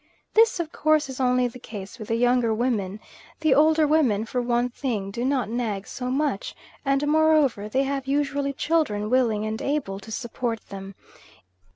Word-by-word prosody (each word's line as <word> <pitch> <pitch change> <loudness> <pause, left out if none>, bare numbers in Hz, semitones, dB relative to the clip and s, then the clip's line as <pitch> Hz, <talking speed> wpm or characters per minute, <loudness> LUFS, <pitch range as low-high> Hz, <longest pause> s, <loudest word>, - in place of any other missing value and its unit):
This 450 -3 +4
of 325 -2 -3
course 305 -1 +2
is 265 - -7
only 250 -1 +3
the 245 +1 -10
case 210 0 -9
with 215 - -7
the 225 - 0
younger 245 -1 +2
women; 215 -4 -1 0.4
the 310 -3 +4
older 310 +2 +4
women 270 -9 +2
for 250 +2 -2
one 240 0 +1
thing 235 -6 -3
do 235 +4 -3
not 265 -1 +1
nag 220 -4 -2
so 250 -1 -5
much, 270 -6 -1 0.3
and 275 +1 +1
moreover 300 -9 +3
they 265 +5 +1
have 275 -1 -3
usually 280 0 0
children 265 -8 0
willing 230 -5 +2
and 215 +1 -3
able 275 -10 -2
to 220 +3 -11
support 235 -1 -4
them. 195 0 -8
250 Hz, 175 wpm, -25 LUFS, 220-285 Hz, 0.4 s, This